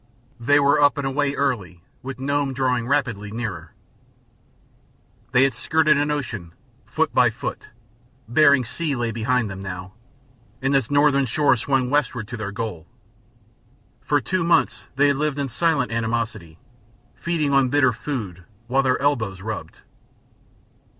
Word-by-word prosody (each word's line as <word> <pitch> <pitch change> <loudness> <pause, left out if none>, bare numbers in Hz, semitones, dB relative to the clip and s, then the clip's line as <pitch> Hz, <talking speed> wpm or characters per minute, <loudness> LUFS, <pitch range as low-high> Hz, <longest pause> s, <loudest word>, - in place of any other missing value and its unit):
They 145 +5 +4
were 145 +1 +3
up 145 +1 +4
and 140 - -2
away 140 +1 0
early, 100 -11 -2 0.2
with 130 0 -7
Nome 140 0 -1
drawing 125 -3 0
rapidly 120 -7 -1
nearer. 110 -1 -5 1.6
They 125 +1 +5
had 135 - +2
skirted 155 -1 +2
an 145 +1 0
ocean, 115 - -4 0.3
foot - - -1
by - - +5
foot; - - -6 0.6
Bering 140 +1 +4
Sea 155 +4 -2
lay 120 -2 -1
behind 120 +1 0
them, 95 -1 -7
now, 95 -1 -7 0.7
and 135 +1 0
its 135 -5 +1
northern 145 -2 +3
shore 145 +3 +3
swung 130 +1 0
westward 130 -7 0
to 120 - -5
their 105 -2 -4
goal. 100 -6 -5 1.1
For 145 +2 +1
two 185 +5 -1
months 165 0 +1
they 140 +2 +3
had 140 - +1
lived 150 -1 -1
in 140 -1 -2
silent 150 -2 +1
animosity, 115 -7 -3 0.6
feeding 160 -4 -1
on 135 -2 +4
bitter 130 -2 +3
food 105 - -5 0.2
while 130 +3 +2
their 130 -1 +1
elbows 110 -10 0
rubbed. 110 +1 -6
130 Hz, 145 wpm, -22 LUFS, 110-145 Hz, 1.6 s, They